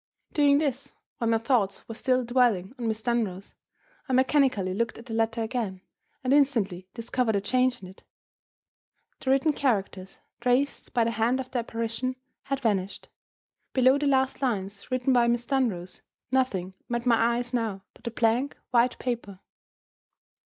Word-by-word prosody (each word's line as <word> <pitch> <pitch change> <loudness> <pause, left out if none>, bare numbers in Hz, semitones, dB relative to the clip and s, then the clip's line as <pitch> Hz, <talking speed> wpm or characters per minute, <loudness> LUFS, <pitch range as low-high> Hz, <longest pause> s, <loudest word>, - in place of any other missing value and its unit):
Doing 285 -1 +5
this 280 -3 -2 0.3
(while 230 -2 0
my 225 - +4
thoughts 225 -5 0
were 225 - -6
still 255 +2 +1
dwelling 235 -5 +2
on 235 - -2
Miss 220 0 -2
Dunross), 215 -6 -1 0.6
I - - 0
mechanically 260 -7 +3
looked 230 +4 -1
at 230 - -11
the 230 - -7
letter 225 +1 0
again 220 -5 -3 0.4
and 255 +1 +2
instantly 225 -11 +2
discovered 230 -1 0
a - - +3
change 250 +3 +1
in - - -7
it. 190 - -16 1.2
The 260 - -4
written 275 +3 +3
characters 200 -8 -1 0.2
traced 250 +4 0
by 235 - +4
the 230 - 0
hand 230 +3 +1
of 260 -1 -6
the 250 - 0
apparition 230 +2 -2 0.3
had 275 0 -2
vanished! 200 -5 -1 0.6
Below 260 +2 +4
the 290 - 0
last 265 -1 +1
lines 200 -6 -2
written 255 +1 +1
by 240 -1 +4
Miss 240 0 +1
Dunross 225 -10 -1 0.3
nothing 200 -9 0 0.2
met 240 0 -2
my 235 -1 +3
eyes 245 +1 -3
now 220 -5 -1
but - - -22
the - - -2
blank 235 +4 +1
white 245 0 +3
paper! 235 -6 -4
235 Hz, 160 wpm, -27 LUFS, 220-255 Hz, 1.2 s, Doing